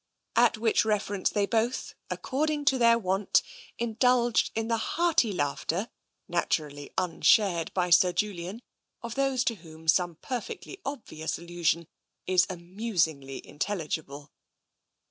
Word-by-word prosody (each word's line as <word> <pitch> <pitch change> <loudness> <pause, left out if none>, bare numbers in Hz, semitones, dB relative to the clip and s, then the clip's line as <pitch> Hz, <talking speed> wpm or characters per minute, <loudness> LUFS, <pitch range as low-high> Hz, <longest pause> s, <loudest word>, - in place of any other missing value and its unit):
At 235 -2 +4
which 225 0 +3
reference 205 -2 0
they 205 -1 +1
both, 230 +4 -1 0.2
according 295 +2 -1
to 270 -3 +3
their 235 -1 +6
wont, 195 -2 +1 0.3
indulged 235 +1 +2
in 225 0 -1
the 230 0 +1
hearty 320 -2 +2
laughter, 170 +5 -2 0.4
naturally 150 -4 -2
un 180 -3 -1
shared 185 -7 +4
by 180 -1 +1
Sir 180 +1 +6
Julian, 200 +3 -3 0.4
of 235 -1 -4
those 270 -1 +1
to 235 - 0
whom 160 -2 -14
some 175 +1 +3
perfectly 315 - -6
obvious 220 - -4
allusion 170 -1 -1 0.4
is 185 0 +3
amusingly 170 -6 -2
intelligible. 150 -5 -4
200 Hz, 125 wpm, -28 LUFS, 170-235 Hz, 0.4 s, their